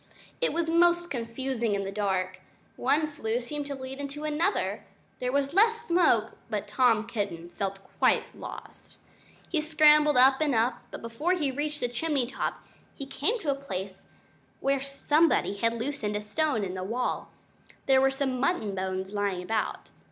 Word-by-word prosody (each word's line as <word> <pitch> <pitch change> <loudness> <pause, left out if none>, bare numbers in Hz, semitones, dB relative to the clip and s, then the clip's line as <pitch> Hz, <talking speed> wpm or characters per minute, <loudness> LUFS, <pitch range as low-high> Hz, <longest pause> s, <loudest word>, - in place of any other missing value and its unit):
It - - +2
was 330 +1 -1
most 345 +1 +3
confusing 235 -2 -2
in 200 - -1
the 195 - -4
dark. 190 -2 -1 0.4
One 310 +2 +2
flue 245 -6 -2
seemed 285 +4 -5
to 280 - -4
lead 265 +1 -7
into 285 +1 -5
another. 310 +6 0 0.4
There 250 0 -1
was 280 +1 0
less 455 +4 +4
smoke, 335 -11 +3
but 210 -2 -3
Tom 225 0 +3
Kitten 200 -8 -4
felt 195 +2 -3 0.2
quite - - +2
lost. - - -10 0.5
He 320 -4 +1
scrambled 300 -2 +5
up 265 +3 +6
and 295 -4 +2
up; 230 +2 +1
but - - -9
before 275 +10 0
he 300 -7 0
reached 295 +2 -3
the 245 - +1
chimney 265 +2 0
top 265 +3 -4 0.3
he 275 - -6
came 295 - -1
to 300 -6 0
a - - +2
place 195 -8 -6 0.5
where 275 0 +1
somebody 275 -4 +2
had 230 +3 +2
loosened 235 -3 -3
a 210 - -1
stone 220 +2 0
in 185 -2 -3
the 185 0 -4
wall. 235 +6 -2 0.6
There 265 -1 +5
were 270 - +5
some 270 -2 -1
mutton 265 - 0
bones 190 0 -3
lying 200 -3 -1
about. 220 +3 -2
265 Hz, 170 wpm, -28 LUFS, 210-300 Hz, 0.6 s, up